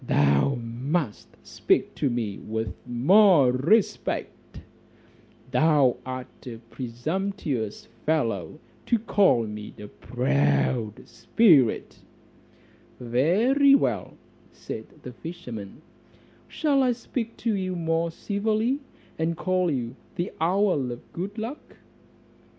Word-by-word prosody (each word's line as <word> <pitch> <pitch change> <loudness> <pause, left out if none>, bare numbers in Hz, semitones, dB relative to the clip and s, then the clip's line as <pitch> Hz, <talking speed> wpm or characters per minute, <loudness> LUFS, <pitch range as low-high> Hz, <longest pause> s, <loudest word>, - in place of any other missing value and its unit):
"Thou 70 - +3
must 120 +3 -3
speak - - 0
to 140 - 0
me 115 -5 -3
with 110 -2 -4
more 150 - +5
respect; 165 - 0 0.9
thou 140 -1 +3
art 130 0 -8
a 115 -2 -6
presumptuous 130 - -3 0.2
fellow 115 - -1 0.3
to 235 - +3
call 200 - +3
me 105 0 -7
a 105 - -9
proud 70 - 0
spirit." 130 - +3 1.0
"Very 205 - +4
well," 120 - -1 0.5
replied 110 - -8
the 125 - -8
fisherman, 130 - -8 0.6
"shall 290 -4 +1
I 250 -2 +3
speak 230 -1 -5
to 230 - -1
you 185 -1 -2
more 165 0 0
civilly, 215 - -1 0.4
and 165 +1 -1
call 185 -1 +1
you 125 -4 -3 0.2
the 175 - -3
owl 170 -6 +1
of 120 - -10
good 195 +5 -5
luck?" 230 +7 -7
145 Hz, 105 wpm, -25 LUFS, 115-195 Hz, 1.0 s, more